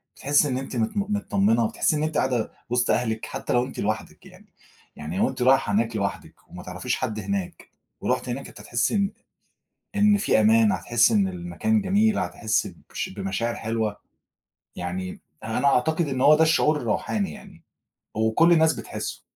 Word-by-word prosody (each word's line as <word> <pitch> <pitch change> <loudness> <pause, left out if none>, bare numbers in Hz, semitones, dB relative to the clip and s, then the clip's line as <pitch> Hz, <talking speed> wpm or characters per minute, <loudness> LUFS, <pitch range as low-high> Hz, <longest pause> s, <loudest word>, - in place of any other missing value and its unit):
بتحسي 145 +1 +2
إن 130 -2 -1
أنتِ 135 0 -6
مت 115 - -1
م - - +3
متطمنة، 210 +2 +1
وتحسي 220 -8 0
إن 150 - -1
أنتِ 155 0 -1
قاعدة 125 -4 0 0.2
وسط 125 0 +1
أهلِك 110 -2 -1
حتى - - -4
لو 120 +1 +2
أنتِ 130 - -9
لوحدِك - - -3
يعني. - - -17 0.4
يعني 75 +4 -6
لو - - +2
أنتِ 130 -1 -7
رايحة 130 -3 +4
هناك 115 +2 +1
لوحدِك 100 -1 -3
وما - - -10
تعرفيش - - -3
حد 110 0 -3
هناك، 100 -3 -4 0.3
ورُحتِ - - -1
هناك 135 +3 -4
أنتِ - - -14
هتحسي 120 - 0
إن 200 -1 +1 0.9
إن 205 0 +5
في 200 - +2
أمان، 110 0 +5
هتحسي 120 - +2
إن 200 -2 +3
المكان 185 +5 -1
جميل، 205 +3 +2
هتحسي 110 -1 -1 0.2
بش - - -3
بمشاعر 100 +4 -3
حلوة. 110 -2 -2 0.8
يعني 90 +1 -5 0.2
يعني 110 0 -3
أنا 140 - +2
أعتقد 155 +5 +2
إن 130 -2 -2
هو 150 +3 +7
ده 160 - +4
الشعور 155 -1 +3
الروحاني 110 - -2
يعني، - - -14 0.5
وكل 110 +10 +3
الناس 160 -1 +5
بتحسه. - - -6
125 Hz, 175 wpm, -24 LUFS, 110-160 Hz, 0.9 s, هو